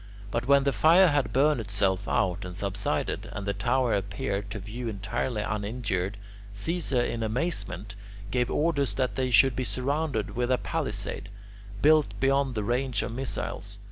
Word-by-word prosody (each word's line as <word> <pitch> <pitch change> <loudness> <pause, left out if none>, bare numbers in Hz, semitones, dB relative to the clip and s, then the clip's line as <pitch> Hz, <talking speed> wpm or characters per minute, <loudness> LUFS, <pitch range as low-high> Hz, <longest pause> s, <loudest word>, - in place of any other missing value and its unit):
But 115 +2 -1
when 140 0 +5
the 140 - +2
fire 165 - +6
had 145 -2 +1
burned 145 +1 +3
itself 100 -1 0
out 90 -5 +1
and 90 0 -6
subsided, 100 -1 -2
and 100 - -5
the 100 - 0
tower 120 +4 +1
appeared 100 +1 -2
to 105 - -5
view 110 +5 -6
entirely 105 +2 -2
uninjured, 105 -3 -2 0.4
Caesar 135 - -1
in 115 -1 -2
amazement 110 - -2 0.4
gave 125 -1 +1
orders 140 -9 +1
that 130 +2 0
they 130 -1 -1
should 120 +2 +5
be 130 - -1
surrounded 130 +1 -1
with 120 +1 0
a 130 - +4
palisade, 100 - -3 0.5
built 155 0 +4
beyond 135 -1 +2
the 105 - -1
range 120 0 0
of - - -4
missiles. 130 +2 -4
120 Hz, 160 wpm, -28 LUFS, 100-135 Hz, 0.5 s, fire